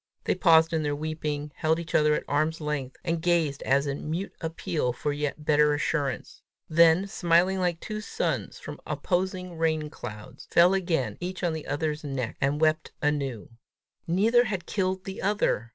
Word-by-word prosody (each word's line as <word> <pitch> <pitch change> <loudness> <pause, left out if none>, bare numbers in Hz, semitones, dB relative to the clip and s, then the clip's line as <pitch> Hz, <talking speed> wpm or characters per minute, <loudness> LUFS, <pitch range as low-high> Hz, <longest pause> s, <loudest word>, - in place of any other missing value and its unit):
They - - +1
paused 165 -2 +5
in 160 - +1
their 145 -1 -1
weeping, 150 -1 -3
held 160 +3 +1
each 170 -1 -7
other 150 0 +4
at - - -2
arm's 155 +3 0
length, 150 -4 -3
and 165 -1 -1
gazed 165 -5 +1
as 140 +2 +2
in 140 +1 -4
mute 175 +5 -3
appeal 160 -5 -2
for 145 +4 -2
yet 150 +1 -3
better 150 -1 +4
assurance; 145 -3 -2 0.3
then, 170 +3 +5
smiling 180 0 +2
like 175 -2 0
two 215 -1 -5
suns - - -2
from - - -9
opposing 180 -2 -2
rain 155 -2 0
clouds, 105 -3 -9
fell 175 +2 +6
again 160 - 0
each 185 +1 -5
on 170 -2 +1
the 160 -1 -6
other's 150 +1 -2
neck, 135 -5 -3
and 140 +2 +1
wept 155 0 +1
anew. 140 -7 -2 0.6
Neither 225 +8 +4
had 195 -5 -3
killed 185 -1 -1
the 190 0 -6
other! 190 - 0
160 Hz, 170 wpm, -27 LUFS, 145-175 Hz, 0.6 s, fell